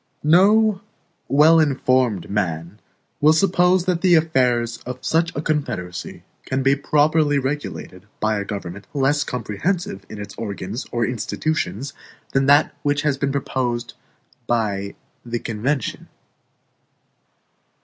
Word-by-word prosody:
No 200 Hz, +6 st, +4 dB, 0.5 s
well 155 Hz, +4 st, +6 dB
informed 130 Hz, -, +1 dB
man 90 Hz, -1 st, -3 dB, 0.4 s
will 155 Hz, +2 st, +5 dB
suppose 180 Hz, +1 st, +3 dB
that 180 Hz, -3 st, 0 dB
the 180 Hz, -2 st, +5 dB
affairs 125 Hz, -7 st, +2 dB
of 125 Hz, +1 st, -8 dB
such 165 Hz, +2 st, +1 dB
a 145 Hz, -, -3 dB
confederacy 120 Hz, -, -3 dB, 0.2 s
can 130 Hz, 0 st, -2 dB
be 135 Hz, +1 st, +4 dB
properly 150 Hz, +1 st, +2 dB
regulated 130 Hz, -8 st, -4 dB
by 110 Hz, -1 st, +1 dB
a -, -, -2 dB
government 100 Hz, -1 st, -7 dB
less 145 Hz, +2 st, +2 dB
comprehensive 165 Hz, -, -3 dB
in 110 Hz, -, -8 dB
its 105 Hz, -, -7 dB
organs 100 Hz, +2 st, -5 dB
or 120 Hz, -1 st, 0 dB
institutions 130 Hz, -, -2 dB, 0.4 s
than 135 Hz, 0 st, +2 dB
that 145 Hz, +2 st, +5 dB
which 145 Hz, 0 st, 0 dB
has 150 Hz, -2 st, +1 dB
been 140 Hz, -1 st, 0 dB
proposed 125 Hz, -3 st, -2 dB, 0.5 s
by 100 Hz, -4 st, -1 dB, 0.3 s
the 120 Hz, 0 st, -3 dB
convention. 120 Hz, +5 st, -3 dB
135 Hz, 120 wpm, -21 LUFS, 110-155 Hz, 0.5 s, well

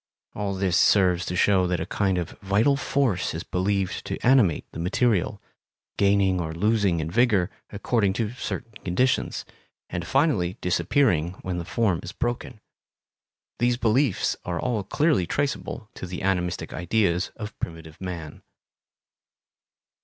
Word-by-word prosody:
All 100 Hz, -1 st, -2 dB
this 95 Hz, -2 st, +1 dB
serves 90 Hz, -3 st, +4 dB
to 90 Hz, -, -2 dB
show 95 Hz, -1 st, +3 dB
that 90 Hz, -1 st, 0 dB
a 80 Hz, -, -2 dB
kind 95 Hz, 0 st, 0 dB
of 85 Hz, -2 st, -3 dB
vital 105 Hz, +8 st, +3 dB
force 130 Hz, -, 0 dB
is 80 Hz, -, -4 dB
believed 95 Hz, +1 st, -1 dB
to -, -, -3 dB
animate 120 Hz, -, +4 dB
the -, -, -8 dB
material, 100 Hz, +2 st, +1 dB, 0.6 s
gaining 100 Hz, -2 st, +3 dB
or 80 Hz, -1 st, -4 dB
losing 100 Hz, -2 st, +2 dB
in 80 Hz, +1 st, -3 dB
vigor 110 Hz, -5 st, +3 dB, 0.2 s
according 100 Hz, -1 st, +1 dB
to 110 Hz, 0 st, -1 dB
certain 115 Hz, -2 st, -5 dB
conditions, 125 Hz, +9 st, 0 dB, 0.5 s
and 90 Hz, -1 st, -4 dB
finally 135 Hz, -, +1 dB
disappearing 90 Hz, -, +1 dB
when 90 Hz, -1 st, -2 dB
the 85 Hz, -, -5 dB
form 100 Hz, -5 st, +1 dB
is 90 Hz, -, -8 dB
broken. 120 Hz, -2 st, -3 dB, 1.0 s
These 120 Hz, 0 st, +2 dB
beliefs 120 Hz, 0 st, +2 dB
are 85 Hz, -2 st, -3 dB
all 120 Hz, -1 st, 0 dB
clearly 140 Hz, -, +1 dB
traceable 140 Hz, -, -3 dB
to 95 Hz, -, -7 dB
the 90 Hz, +1 st, -6 dB
animistic 90 Hz, -2 st, -1 dB
ideas 90 Hz, 0 st, +1 dB
of 105 Hz, -1 st, -8 dB
primitive 80 Hz, -1 st, -7 dB
man. 85 Hz, -5 st, -6 dB
95 Hz, 140 wpm, -25 LUFS, 90-115 Hz, 1.0 s, serves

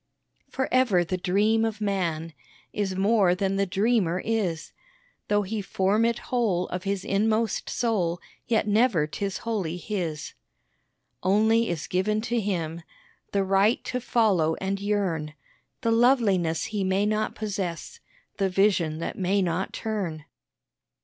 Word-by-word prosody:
For 265 Hz, 0 st, -2 dB
ever 240 Hz, -9 st, +4 dB
the 185 Hz, -, -2 dB
dream 205 Hz, +5 st, +2 dB
of 220 Hz, -1 st, -2 dB
man 170 Hz, -6 st, -2 dB, 0.4 s
Is 195 Hz, -2 st, -1 dB
more 195 Hz, -2 st, +3 dB
than 195 Hz, 0 st, -1 dB
the 200 Hz, 0 st, +1 dB
dreamer 195 Hz, -2 st, +1 dB
is; 200 Hz, -8 st, -1 dB, 0.6 s
Though 205 Hz, 0 st, +2 dB
he 210 Hz, +2 st, -3 dB
form 195 Hz, +3 st, +1 dB
it 235 Hz, 0 st, +1 dB, 0.2 s
whole 200 Hz, -8 st, +1 dB
of 180 Hz, +2 st, -5 dB
his 195 Hz, -1 st, -2 dB
inmost 220 Hz, +2 st, 0 dB
soul, 185 Hz, -8 st, 0 dB, 0.3 s
Yet 225 Hz, -3 st, +1 dB
never 210 Hz, -6 st, +3 dB
'tis 195 Hz, +5 st, -4 dB
wholly 195 Hz, -7 st, -2 dB
his. 175 Hz, -6 st, -4 dB, 0.9 s
Only 220 Hz, +4 st, +3 dB
is 170 Hz, -4 st, -3 dB
given 210 Hz, +4 st, 0 dB
to 235 Hz, +1 st, -1 dB
him 170 Hz, -5 st, -2 dB, 0.5 s
The 200 Hz, -1 st, +1 dB
right 195 Hz, +4 st, +2 dB
to 250 Hz, -, -3 dB
follow 195 Hz, -10 st, +2 dB
and 195 Hz, +1 st, -3 dB
yearn 185 Hz, -7 st, -1 dB, 0.5 s
The 230 Hz, -3 st, +1 dB
loveliness 225 Hz, -9 st, +3 dB
he 210 Hz, -2 st, -2 dB
may 190 Hz, +2 st, +1 dB
not 215 Hz, +1 st, -1 dB
possess, 200 Hz, -, -4 dB, 0.4 s
The 195 Hz, -1 st, +1 dB
vision 185 Hz, -5 st, +2 dB
that 165 Hz, -, -5 dB
may 195 Hz, +1 st, +2 dB
not 180 Hz, +2 st, -1 dB
turn. 185 Hz, -9 st, -4 dB
195 Hz, 140 wpm, -26 LUFS, 180-220 Hz, 0.9 s, ever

